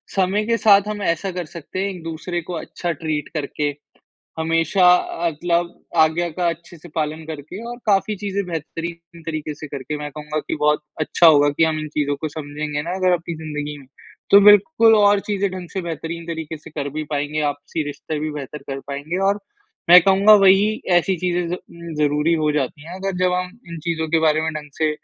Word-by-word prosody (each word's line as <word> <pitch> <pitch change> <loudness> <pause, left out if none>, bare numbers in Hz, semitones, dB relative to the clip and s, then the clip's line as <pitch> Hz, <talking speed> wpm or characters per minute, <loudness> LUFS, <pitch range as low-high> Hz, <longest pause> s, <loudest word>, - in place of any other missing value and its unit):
समय 195 +2 +2
के 230 0 +1
साथ 205 -2 +5
हम 210 -1 -4
ऐसा 185 +1 -1
कर 180 -2 -4
सकते 170 +3 -8
हैं 195 +1 0
एक-दूसरे 175 -1 -5
को 175 +2 -7
अच्छा 170 +1 -4
ट्रीट 155 -2 -3
करके। 145 0 -2 0.7
हमेशा 165 +3 +2
अ, 170 -1 -2
तलब 170 +2 -1 0.3
आज्ञा 160 +2 +1
का 175 +2 -1
अच्छे 170 +1 -6
से 170 +2 -13
पालन 155 0 -2
करके 160 +6 -7
और 240 - -6
काफ़ी 205 +1 +2
चीज़ें 200 0 -3
बेहतरीन 170 +1 -6
तरीक़े 155 -2 -4
से 155 +2 -8
करके 140 +2 -5
मैं 150 0 -5
कहूँगा 150 +1 -5
कि - - 0
बहुत 150 0 +3 0.2
अच्छा 160 +2 +3
होगा 145 -2 +6
कि 145 +3 +2
हम 160 -1 0
इन 155 0 -5
चीज़ों 145 -1 -1
को 155 - -2
समझेंगे 150 0 -4
ना 170 - -5
अगर 185 -1 +2
आपकी 170 -1 -2
ज़िंदगी 150 -2 -5
में, 135 - -15 0.4
तो 200 - +9
बिल्कुल 215 +3 +6
और 205 -1 +5
चीज़ें 200 -1 0
ढंग 185 -2 -7
से 195 - -2
बेहतरीन 165 0 -5
तरीक़े 160 -2 -5
से 150 - -13
कर 145 -2 -4
भी 155 +2 -4
पाएँगे, 150 +1 -1
आपसी 145 +1 -2
रिश्ते 145 +2 -5
भी 155 - -2
बेहतर 145 0 -7
कर 135 - -5
पाएँगे। 145 +5 -4
और 200 +1 +1 0.5
मैं 180 +1 +11
कहूँगा 195 +3 +6
वही 200 +4 +4 0.2
ऐसी 185 +2 +2
चीज़ें 175 0 -1
ज 180 - -2 0.4
ज़रूरी 150 +2 +2
हो 155 -1 +1
जाती 145 0 -2
हैं, 175 - -8
अगर 190 0 -3
जब 180 - +2
हम 180 0 -1 0.2
इन 170 -1 -7
चीज़ों 160 -1 -1
के 165 - +3
बारे 155 -1 +3
में 160 0 -1
ढंग 150 -1 -7
से 155 -1 +2
165 Hz, 205 wpm, -21 LUFS, 150-180 Hz, 0.7 s, मैं